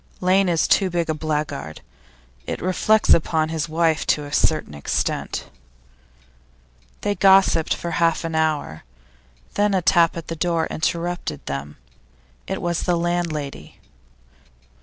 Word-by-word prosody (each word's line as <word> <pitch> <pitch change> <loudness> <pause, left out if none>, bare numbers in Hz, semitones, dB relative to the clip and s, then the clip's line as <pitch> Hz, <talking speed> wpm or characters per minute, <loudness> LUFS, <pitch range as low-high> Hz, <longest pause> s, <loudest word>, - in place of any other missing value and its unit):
Lane 185 +1 +3
is 165 -2 +2
too 195 -2 +3
big 170 -2 -1
a - - 0
blackguard; 150 - -4 0.7
it - - -3
reflects 210 +4 +3
upon 160 -1 +1
his 160 -1 -3
wife 160 -1 +1
to 150 - +1
a 145 - -9
certain 155 - +1
extent.' 70 -1 -2 1.6
They 205 - 0
gossiped 190 -4 +4
for 170 - -5
half 165 +1 +1
an 165 0 -4
hour, 155 - -1 0.7
then 205 -1 +1
a 185 - +2
tap 170 -2 +3
at 165 - -7
the 165 - -4
door 165 0 0
interrupted 175 +2 -3
them; 70 +1 -5 0.7
it - - -4
was 175 -1 -1
the 175 -1 +1
landlady. 170 - -3
165 Hz, 135 wpm, -22 LUFS, 155-175 Hz, 1.6 s, gossiped